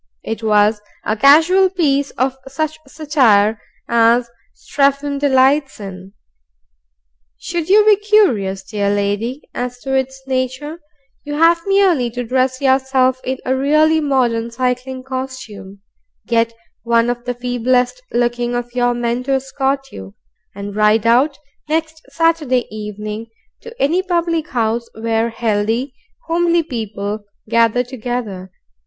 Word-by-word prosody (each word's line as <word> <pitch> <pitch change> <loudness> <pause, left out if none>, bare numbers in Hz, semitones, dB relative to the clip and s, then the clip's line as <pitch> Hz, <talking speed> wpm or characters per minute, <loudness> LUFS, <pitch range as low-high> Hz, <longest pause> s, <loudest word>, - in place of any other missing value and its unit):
It 225 +1 -4
was 210 -1 +3 0.2
a 215 - 0
casual 325 - +5
piece 285 -6 +1
of 260 +1 0
such 310 +3 -3
satire 250 -8 +2 0.3
as 235 +1 +3 0.3
Strephon 280 0 0
delights 275 0 +2
in. 190 -1 -9 1.2
Should 340 -1 -4
you 420 +2 +6
be 425 -2 +6
curious, 295 - +2
dear 200 0 -2
lady, 205 +6 -1
as 245 0 -4
to 270 - -4
its 265 0 -1
nature, 260 +4 -3 0.4
you 290 0 -5
have 335 +2 +4
merely 375 -11 +3
to 245 +2 -4
dress 255 +2 0
yourself 260 -1 +2
in 260 +1 -2
a 260 - +1
really 305 +4 +3
modern 245 -5 0
cycling 255 +1 -3
costume, 255 -7 -7 0.4
get 230 -1 +1 0.3
one 230 0 +2
of 240 0 -3
the 245 0 -3
feeblest 250 - 0
looking 240 0 0
of 240 0 -4
your 245 -1 +1
men 240 0 -1
to 275 - 0
escort 270 0 -2
you, 95 0 -10 0.4
and 200 0 -7
ride 215 +1 +3
out, 260 +5 +3 0.3
next 320 0 -2
Saturday 315 -7 +1
evening, 210 +1 -6 0.3
to 470 0 -12
any 330 +7 +2
public 340 -3 -1
house 230 -1 -1
where 225 +1 0
healthy, 225 +3 -1 0.3
homely 340 0 +2
people 215 -5 -5 0.2
gather 230 +2 +2
together. 235 -7 -5
255 Hz, 130 wpm, -18 LUFS, 230-285 Hz, 1.2 s, you